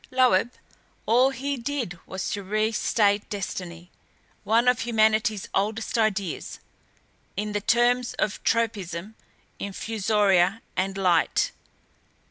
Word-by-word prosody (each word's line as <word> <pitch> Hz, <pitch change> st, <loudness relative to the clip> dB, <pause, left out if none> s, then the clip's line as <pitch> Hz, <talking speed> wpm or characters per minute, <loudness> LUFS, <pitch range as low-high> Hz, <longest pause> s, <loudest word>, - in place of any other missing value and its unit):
Loeb 250 Hz, -4 st, +3 dB, 0.6 s
all 250 Hz, +4 st, +4 dB
he 275 Hz, +1 st, -3 dB
did 235 Hz, -8 st, -4 dB
was 190 Hz, 0 st, -4 dB
to 205 Hz, -, -3 dB
restate 210 Hz, 0 st, +1 dB
destiny, 180 Hz, -3 st, -6 dB, 0.5 s
one 225 Hz, +4 st, +2 dB
of 250 Hz, -1 st, +4 dB
humanity's 220 Hz, -3 st, +1 dB
oldest 215 Hz, +3 st, -1 dB
ideas, 200 Hz, -6 st, -1 dB, 0.8 s
in 210 Hz, +1 st, -2 dB
the 205 Hz, 0 st, -2 dB
terms 240 Hz, +2 st, +2 dB
of 210 Hz, -, -2 dB
tropisms, 210 Hz, -4 st, -1 dB, 0.5 s
infusoria 200 Hz, -1 st, +1 dB
and 195 Hz, +1 st, -1 dB
light. 185 Hz, -3 st, +2 dB
215 Hz, 100 wpm, -25 LUFS, 195-230 Hz, 0.8 s, all